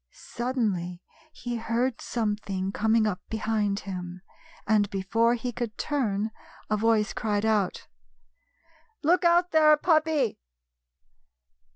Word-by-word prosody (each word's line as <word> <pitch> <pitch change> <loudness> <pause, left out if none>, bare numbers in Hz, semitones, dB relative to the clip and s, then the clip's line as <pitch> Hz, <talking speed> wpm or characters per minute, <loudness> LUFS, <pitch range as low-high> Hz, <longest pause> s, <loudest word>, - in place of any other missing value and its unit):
Suddenly 210 -9 -3 0.3
he 240 -5 -5
heard 230 +2 -1
something 205 -4 -2
coming 220 +2 +2
up 205 -4 -2
be 220 - -2
hind 210 -2 0
him, 180 -1 -7 0.4
and, 205 -1 +2
before 225 +5 +1
he 245 +1 -4
could 235 -2 -5
turn, 220 -7 -1 0.4
a - - +4
voice 215 -1 +2
cried 210 -2 -1
out: 210 -4 0 0.6
" 330 +6 -36
Look 350 +5 +3
out 345 +1 +4
there, 305 -1 +6
puppy 310 - +1
225 Hz, 115 wpm, -27 LUFS, 205-260 Hz, 0.6 s, there